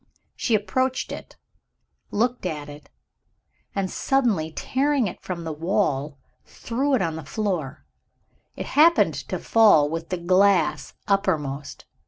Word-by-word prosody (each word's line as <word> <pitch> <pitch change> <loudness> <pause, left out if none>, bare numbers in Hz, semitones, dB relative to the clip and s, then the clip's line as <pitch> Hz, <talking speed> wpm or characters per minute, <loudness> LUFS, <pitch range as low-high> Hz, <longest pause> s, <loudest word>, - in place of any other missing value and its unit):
She 235 - +1
approached 260 +5 -1
it - - -9 0.7
looked 240 -1 0
at 150 -3 -5
it 145 +1 -12 0.9
and, 195 -2 -1
suddenly 225 -13 +1
tearing 275 - 0
it 185 - -6
from 175 -2 -5
the 160 -1 -4
wall, 150 -4 -1 0.3
threw 270 +4 -1
it 215 - +1
on 165 -2 -2
the 160 - -7
floor. 160 -4 -3 0.7
It - - -5
happened 330 +4 +4
to - - -5
fall 210 -10 +5
with 165 0 -4
the 185 - -2
glass 185 +2 +2
uppermost. 150 -8 -1
190 Hz, 130 wpm, -24 LUFS, 155-235 Hz, 0.9 s, fall